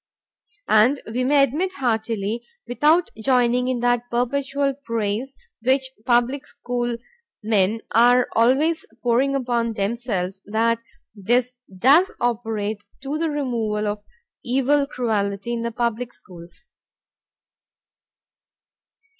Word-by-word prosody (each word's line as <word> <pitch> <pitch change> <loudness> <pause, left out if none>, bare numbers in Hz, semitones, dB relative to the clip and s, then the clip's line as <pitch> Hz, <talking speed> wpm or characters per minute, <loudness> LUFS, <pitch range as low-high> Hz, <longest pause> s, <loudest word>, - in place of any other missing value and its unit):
And 225 +6 +4
we 240 +3 -2
may 280 +2 +4
admit 320 +8 0
heartily 225 - -1 0.2
(without 305 +8 +2
joining 250 0 +2
in 255 -2 -1
that 245 0 +1
perpetual 275 +3 0
praise 230 -1 -3 0.3
which 260 +2 +1 0.2
public 250 +3 +2
school 240 -1 -3 0.5
men 215 0 +1
are 245 +2 +5
always 275 +8 +3 0.2
pouring 255 +3 +2
upon 240 -3 0
themselves) 195 -3 -2
that 225 +2 +1 0.3
this 240 +5 0 0.2
does 295 - +5
operate 220 -3 -2 0.2
to 285 +3 -3
the 330 0 0
removal 230 -7 -1
of 210 0 -2
mere 205 - -36 0.3
evil 270 +3 +2
cruelty 215 -4 -2
in 235 - -2
the 235 0 -2
public 235 +1 -2
schools. 170 0 -13
240 Hz, 110 wpm, -22 LUFS, 220-265 Hz, 0.5 s, are